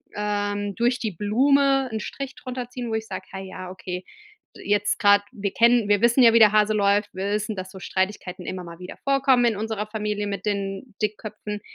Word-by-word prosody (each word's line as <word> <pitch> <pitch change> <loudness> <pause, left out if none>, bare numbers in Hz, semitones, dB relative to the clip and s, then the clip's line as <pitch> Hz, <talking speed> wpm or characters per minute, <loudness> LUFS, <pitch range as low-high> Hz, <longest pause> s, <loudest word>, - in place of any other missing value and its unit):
ähm, 205 -1 -2
durch 240 +2 +1
die 220 -3 -2
Blume 270 - +2
'n 220 - -1
Strich 270 +3 -6
drunter 250 -1 -6
ziehen, 250 -1 -5
wo 225 - -3
ich 220 0 -3
sag: - - -6
„Hey, 190 0 -7
ja, 185 -1 -8
okay, 180 0 -6 0.5
jetzt 205 0 0
grad 205 0 +6
wir 200 -1 -3
kennen 235 -2 +4
wir 205 -1 +3
wissen 235 +2 +5
ja, 230 -1 +7
wie 230 - +6
der 215 -2 +7
Hase 215 0 +3
läuft. 205 0 +2
Wir 190 +2 -3
wissen, 210 0 -1
dass 185 0 -6
so 190 - -10
Streitigkeiten 190 -1 -3
immer 185 -1 -5
mal 170 0 -10
wieder 180 0 -9
vorkommen 270 -3 +3
in 230 -3 +2
unserer 215 0 -3
Familie 210 -1 -3
mit 200 -1 -4
den 200 +2 -3
Dickköpfen, 210 0 -4
210 Hz, 205 wpm, -24 LUFS, 200-235 Hz, 0.5 s, ja